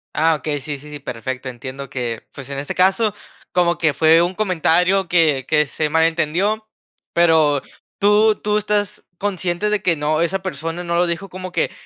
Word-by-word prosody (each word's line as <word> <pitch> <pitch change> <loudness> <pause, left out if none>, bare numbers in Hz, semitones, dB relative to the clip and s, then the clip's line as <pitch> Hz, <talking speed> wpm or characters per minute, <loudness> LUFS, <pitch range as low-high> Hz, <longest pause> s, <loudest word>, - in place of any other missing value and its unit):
Ah, 160 +1 +3
okey, 145 -2 -3
sí, 145 0 -5
sí, 150 +2 -13
sí, 145 - -7
perfecto. 130 +1 -5
Entiendo 130 +2 -8
que, 120 -3 -4
pues, 140 -2 -9
en 140 - -3
este 145 - -5
caso, 195 +3 +2 0.4
como 175 -1 +2
que 155 -3 +2
fue 160 +1 +5
un 175 +2 0
comentario 185 -1 +2
que 155 -7 +2
que 150 -1 +3
se 150 +2 -2
malentendió, 170 +7 +1 0.5
pero 160 -5 +4 0.3
tú 210 +1 +4
tú 210 0 -1
estás 205 -1 -2
consciente 190 0 -1
de 210 - +1
que 170 - +2
no, 155 +1 0
esa 190 +3 -1
persona 165 0 -4
no 170 0 -1
lo 175 - +3
dijo 170 +3 -3
como 185 0 -7
que: - - 0
165 Hz, 180 wpm, -20 LUFS, 150-190 Hz, 0.5 s, fue